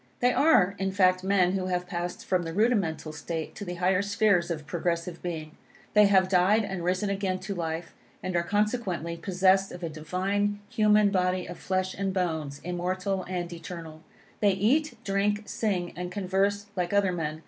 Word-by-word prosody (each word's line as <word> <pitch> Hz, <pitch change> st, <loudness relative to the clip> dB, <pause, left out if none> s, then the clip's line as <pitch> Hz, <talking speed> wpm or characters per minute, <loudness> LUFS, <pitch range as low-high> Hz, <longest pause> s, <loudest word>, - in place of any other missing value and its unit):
They 245 Hz, 0 st, +3 dB
are, 200 Hz, -, +4 dB
in 195 Hz, 0 st, 0 dB
fact, 185 Hz, -1 st, +3 dB
men 190 Hz, -2 st, +3 dB
who 185 Hz, -1 st, -1 dB
have 180 Hz, -1 st, -1 dB
passed 175 Hz, +4 st, -4 dB
from 185 Hz, -4 st, +1 dB
the 165 Hz, -1 st, -5 dB
rudimental 185 Hz, -8 st, +1 dB
state 160 Hz, +1 st, -5 dB
to -, -, -7 dB
the 180 Hz, -2 st, -5 dB
higher 185 Hz, +2 st, +2 dB
spheres 200 Hz, -3 st, +2 dB
of 155 Hz, -3 st, -4 dB
progressive 170 Hz, +1 st, -2 dB
being. 160 Hz, -3 st, -5 dB, 0.4 s
They 210 Hz, -1 st, +7 dB
have 190 Hz, -2 st, +4 dB
died 195 Hz, +4 st, +3 dB
and 190 Hz, -3 st, -4 dB
risen 185 Hz, +3 st, 0 dB
again 195 Hz, -2 st, -1 dB
to 200 Hz, +1 st, -4 dB
life, 165 Hz, -1 st, -4 dB, 0.3 s
and 185 Hz, -1 st, -3 dB
are 170 Hz, -, +3 dB
consequently 200 Hz, -3 st, -1 dB
possessed 190 Hz, +2 st, +2 dB
of 180 Hz, 0 st, -9 dB
a 165 Hz, -, -2 dB
divine, 195 Hz, +6 st, -1 dB
human 210 Hz, -1 st, +4 dB
body 185 Hz, -1 st, +1 dB
of 175 Hz, -, -8 dB
flesh 185 Hz, 0 st, -1 dB
and 195 Hz, 0 st, -2 dB
bones, 160 Hz, -6 st, -2 dB
immortal 185 Hz, +2 st, -2 dB
and 175 Hz, -1 st, -4 dB
eternal. 165 Hz, -2 st, -8 dB, 0.4 s
They 205 Hz, -2 st, +4 dB
eat, 265 Hz, +11 st, +1 dB
drink, 205 Hz, +2 st, 0 dB
sing 185 Hz, -7 st, -2 dB
and 180 Hz, 0 st, -5 dB
converse 200 Hz, +1 st, 0 dB
like 180 Hz, 0 st, -1 dB
other 200 Hz, -2 st, +3 dB
men. 155 Hz, -3 st, -3 dB
185 Hz, 180 wpm, -27 LUFS, 175-200 Hz, 0.4 s, They